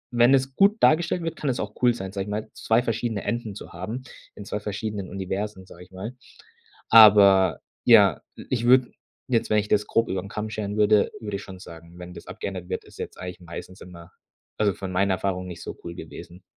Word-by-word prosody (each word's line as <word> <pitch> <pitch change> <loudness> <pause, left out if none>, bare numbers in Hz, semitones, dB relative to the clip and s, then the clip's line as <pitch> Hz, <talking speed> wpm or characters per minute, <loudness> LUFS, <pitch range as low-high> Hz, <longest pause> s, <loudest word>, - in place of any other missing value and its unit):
wenn 120 +3 +6
es 130 0 -1
gut 200 +5 +4
dargestellt 165 +2 +3
wird, 165 0 -3
kann 145 - -3
es 125 - -1
auch 105 0 -4
cool 125 -1 +5
sein, 95 -4 -6
sage 95 -1 -4
ich - - -8
mal, 105 +1 -3
2 115 +2 +1
verschiedene 115 -2 -2
Enden 115 -4 -3
zu - - -10
haben 110 +9 -6 0.3
in 100 - -9
2 105 - -3
verschiedenen 105 -2 -5
Universen, 95 0 -4
sage 90 - -14
ich 90 - -18
mal. 100 +7 -7 0.7
Aber 100 -5 +7 0.2
ja, - - +6 0.3
ich 120 -2 -1
würde 125 0 +5 0.4
jetzt 120 -3 0
wenn 110 - +3
ich 105 0 0
das 105 0 +2
grob 115 - +1
über 95 - -2
'n 100 - -10
Kamm 105 +1 -4
scheren 105 -1 -4
würde, 105 -1 +4
würde 105 -4 -4
ich - - -9
schon 95 -1 -10
sagen, 85 -1 -13
wenn 90 0 -9
das - - -12
abgeändert 90 -3 -6
wird, - - -3
ist - - -17
jetzt - - -6
eigentlich 90 0 -7
meistens 90 +2 -10
immer, 85 -2 -12 0.5
also 105 -2 +2
von 95 -1 -6
meiner 95 +1 +1
Erfahrung, 90 -1 -3
nicht 85 -1 -8
so - - -7
cool 85 0 -7
gewesen. 85 +2 -10
100 Hz, 215 wpm, -25 LUFS, 95-115 Hz, 0.7 s, Aber